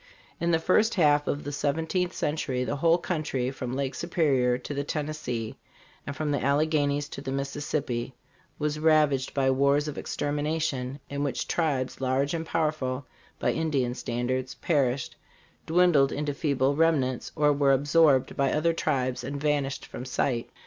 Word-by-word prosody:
In 170 - 0
the 165 - +4
first 215 +7 +2
half 150 -4 +3
of 145 - -1
the 145 - -4
seventeenth 160 +5 -1
century 135 -4 -1
the 145 +3 -2
whole 165 +3 +4
country, 155 -8 -2
from 130 -1 -5
Lake 135 -1 -2
Su 170 - -5
perior 135 -8 +2
to - - -5
the 140 0 -2
Tennessee 140 -6 -4 0.5
and 140 - -4
from 150 0 -2
the 140 -4 -1
Alleghenies 145 0 +1
to 140 - -7
the 135 - -4
Mississippi, 135 -3 -3 0.4
was 150 0 -2
rav 155 -2 +4
aged 130 -1 -3
by 135 -1 +3
wars 140 +2 +2
of 150 - -4
extermination, 145 -2 -2
in 140 0 -3
which 135 -4 -2
tribes, 140 -7 -1
large 135 +3 +1
and 165 -1 -3
powerful, 145 -5 -1 0.3
by - - +1
Ind 160 -2 -1
ian 125 -2 +1
standards, 125 +2 -2
perished, 135 -5 0 0.5
dwindled 165 -5 +4
into 145 0 -2
feeble 140 -2 +1
remnants 145 -6 +1
or 150 -1 +3
were 140 -1 +3
absorbed 145 0 +3
by 140 -1 +1
other 165 +2 +2
tribes 130 -6 -1
and 140 +2 -4
vanished 140 -2 -1
from - - -8
sight." 125 -1 -1
145 Hz, 165 wpm, -27 LUFS, 130-155 Hz, 0.5 s, the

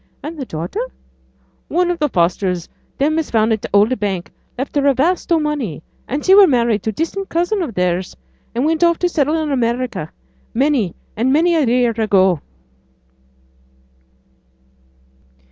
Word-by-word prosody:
'And 315 +3 -5
the 280 -4 -5
daughter?' 165 - -5 0.9
'One 355 +1 +1
o' - - -1
th' 300 -4 -1
Fosters, 175 0 0 0.3
them 310 +3 +1
as 320 - -3
founded 220 -1 +1
t' - - -4
Old 210 +5 +3
Bank, 195 -4 -3 0.3
left 265 +4 -4
her 285 -1 +2
a 275 - +4
vast 340 +7 0
o' 335 - +5
money; 285 - -3 0.2
and 280 +3 -3
she 375 - +6
were 400 -1 +8
married 235 - +2
to 220 - -2
distant 355 - -3
cousin 350 +5 0
of 270 - -4
theirs, 180 0 -1 0.4
and 245 +4 +1
went 325 +2 +1
off 340 -1 +4
to 355 - +1
settle 300 -2 +1
in 310 -2 -2
America 240 - -1 0.4
many 260 - +1 0.2
and 240 +5 +1
many 335 +5 +3
a 315 -4 +2
year 245 0 +3
ago.' 190 -6 +3
260 Hz, 160 wpm, -18 LUFS, 210-320 Hz, 0.9 s, were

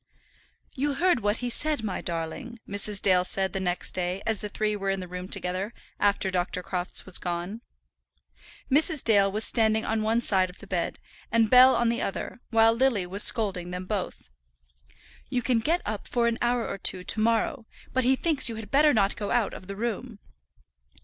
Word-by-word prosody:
"You 280 +1 -1
heard 350 -1 +2
what 205 0 0
he - - -1
said, 300 -2 0
my 200 -4 -3
darling," 165 +6 -5
Mrs. 200 0 +2
Dale 185 -2 +4
said 190 +1 -1
the 195 - -2
next 180 -1 -2
day, 180 +1 -3
as 225 -3 0
the 210 - -4
three 210 +1 -1
were 195 -1 -3
in 195 0 -1
the 180 - -7
room 180 +1 -7
together 185 +5 -4 0.2
after 200 -1 +2
Dr. 180 0 -2
Crofts 180 0 -4
was 190 - 0
gone. 175 +5 -4 1.1
Mrs. 305 +1 +4
Dale 200 -3 +3
was 215 +2 +2
standing 220 -1 +3
on 220 0 -1
one 220 +2 +1
side 190 -5 +2
of 180 - -13
the - - -13
bed, - - -3 0.3
and 225 -2 +2
Bell 255 +1 +8
on 235 -1 +1
the 235 - -1
other, 240 +5 -5
while 225 -1 +4
Lily 235 -6 +1
was 195 +3 -1
scolding 190 -6 +2
them 180 +1 -6
both. 190 - -5 1.0
"You 245 - -1
can 245 -2 +2
get 330 +10 0
up 210 0 -5
for 240 -1 0
an 230 -1 -1
hour 240 -1 0
or 195 - -5
two 185 -1 +2
to 205 - -1
morrow, 230 +2 0 0.3
but 260 - +1
he 260 +2 +3
thinks 295 -3 +1
you 230 - -5
had 220 -2 -9
better 295 0 +4
not 200 -2 +2
go 205 -1 -5
out 235 -4 0
of 185 - -10
the 200 - -6
room." 230 +1 -4
215 Hz, 200 wpm, -26 LUFS, 190-235 Hz, 1.1 s, Bell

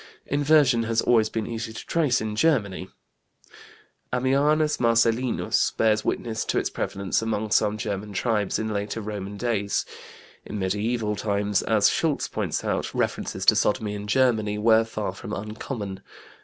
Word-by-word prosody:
Inversion 145 -4 +3
has 115 0 0
always 110 -3 +3
been 110 -1 -3
easy 115 -1 -5
to - - -8
trace 150 -7 +1
in 110 -1 -3
Germany. 105 - +1 1.2
Ammianus 145 +5 +2
Marcellinus 115 +1 +2
bears 110 -1 +2
witness 110 -2 -2
to - - -1
its - - 0
prevalence 100 0 -2
among 110 -1 -2
some 105 0 +2
German 105 -1 -4
tribes 105 -1 0
in 110 0 -2
later 105 +2 -3
Roman 105 -2 -5
days. 105 -3 -1 0.6
In 105 - -6
mediæval 105 +2 -1
times, 100 -1 0
as 110 -2 +3
Schultz 155 -4 0
points - - -3
out, - - -2
references - - -2
to - - +7
sodomy 105 0 +1
in 105 0 -6
Germany 110 -3 +2
were 110 +1 +4
far 110 -2 -4
from 110 -2 -8
uncommon. 105 -1 -5
110 Hz, 145 wpm, -25 LUFS, 105-120 Hz, 1.2 s, to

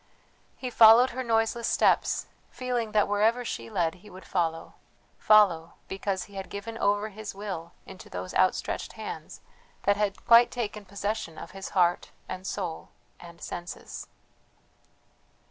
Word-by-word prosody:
He 255 -1 -5
followed 230 +3 +8
her 260 - -4
noiseless 230 -1 +1
steps, - - +2 0.2
feeling 245 -3 -3
that 210 -1 +3
wherever 220 +4 +2
she 115 - -5
led 165 +3 0
he 210 - -14
would 185 0 -12
follow, 165 -3 -2 0.5
follow, 190 -7 +4
because 190 -1 -2
he 200 - -15
had 195 -1 -6
given 210 +3 -6
over 205 -1 +1
his 215 -1 -8
will 190 -5 -6
into 190 -1 -12
those 90 +1 -6
outstretched - - 0
hands, - - -8 0.4
that 200 0 +3
had 205 -2 -2
quite 235 +1 +7
taken 210 -4 -4
possession 200 -3 -4
of - - -9
his 195 0 -7
heart, 175 -1 +2 0.2
and 185 +1 -6
soul, 175 -5 -4 0.3
and 170 -1 -13
senses. 175 0 -7
200 Hz, 145 wpm, -27 LUFS, 180-225 Hz, 0.5 s, followed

